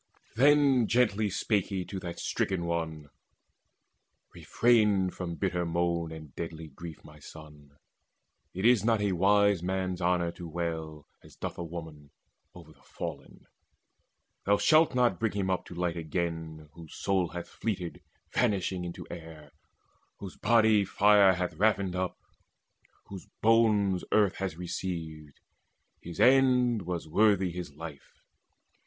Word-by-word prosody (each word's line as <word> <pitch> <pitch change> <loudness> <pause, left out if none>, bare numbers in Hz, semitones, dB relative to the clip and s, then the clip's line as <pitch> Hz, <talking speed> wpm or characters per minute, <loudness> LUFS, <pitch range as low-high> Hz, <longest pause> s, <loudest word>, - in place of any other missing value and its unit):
Then 135 -2 +4
gently 110 -3 +2
spake 100 0 0
he 95 -3 -3
to 95 - -6
that 85 -2 -7
stricken 90 -3 -2
one: 80 -3 -4 1.2
"Refrain 105 -6 +2
from 85 -2 -5
bitter 90 -1 -1
moan 85 -1 -1
and 80 -3 -10
deadly 80 -1 -7
grief, 80 +3 -10
My 75 0 -15
son. 75 -1 -14 0.7
It 95 +3 -4
is 120 -4 +5
not 115 -1 +2
for 105 - 0
a 100 - +1
wise 100 +1 +3
man's 95 0 -2
honour 85 -1 +1
To 85 0 -9
wail, 80 -2 -5 0.2
as - - -16
doth - - -6
a - - -3
woman, 80 -3 -9 0.5
o'er 80 -3 -13
the - - -27
fallen. - - -8 1.0
Thou 100 0 +4
shalt 155 0 +4
not 120 -8 +2
bring 115 -2 0
him 95 -2 -1
up 95 - -2
to 90 - -10
light 85 -1 -2
again 80 -1 -4
Whose 80 -2 -12
soul 95 -3 0
hath 85 +2 -7
fleeted 95 -6 -4 0.3
vanishing 95 -2 0
into 85 -1 -7
air, 80 -3 -10 0.7
Whose 95 -2 -9
body 110 -3 +4
fire 100 0 +5
hath 90 +1 -2
ravined 100 -3 +1
up, 90 0 -2 0.9
whose 95 -2 -10 0.2
bones 105 -4 +3
Earth 105 -4 +3
has 95 -5 -4
received. 80 -4 -6 0.6
His 85 -1 -9
end 125 -6 +4
was 85 -3 -4
worthy 100 +1 +3
his 85 -4 -7
life. 75 -3 -10
90 Hz, 140 wpm, -29 LUFS, 85-100 Hz, 1.2 s, is